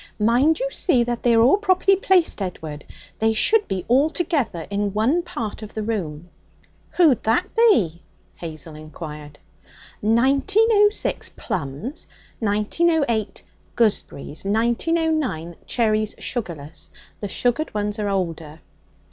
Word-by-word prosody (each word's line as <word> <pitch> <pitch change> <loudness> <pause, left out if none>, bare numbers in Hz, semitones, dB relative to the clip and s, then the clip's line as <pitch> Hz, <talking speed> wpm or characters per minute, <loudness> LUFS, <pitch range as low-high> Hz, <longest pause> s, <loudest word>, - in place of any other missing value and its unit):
'Mind 245 - +3
you - - 0
see 275 - +2
that 240 0 -3
they 235 -1 +3
are 225 - +5
all 255 +11 +5
properly 390 -1 +3
placed, 370 - +2
Edward; 160 -5 -6 0.3
they 220 0 +2
should 420 - +3
be 185 -2 -3
all 265 +6 +4
together 280 - -1
in 200 0 -1
one 255 +11 +2
part 230 -11 -6
of 215 - -10
the 215 - -2
room.' 175 -8 -4 0.7
'Who'd 315 -9 +5
that 225 +2 0
be?' 220 - +3 0.3
Hazel 160 -1 -8
inquired. 150 -1 -9 0.6
'1906, 400 - +2
plums; 160 - -4 0.3
1908, 220 - 0 0.3
gooseberries; 200 -9 -1
1909, 235 - 0
cherries, 215 -2 0
sugarless. 165 - -5 0.3
The 205 - -4
sugared 245 +9 0
ones 210 0 -2
are 205 -1 -1
older.' 165 -5 -3
220 Hz, 120 wpm, -22 LUFS, -, 0.7 s, are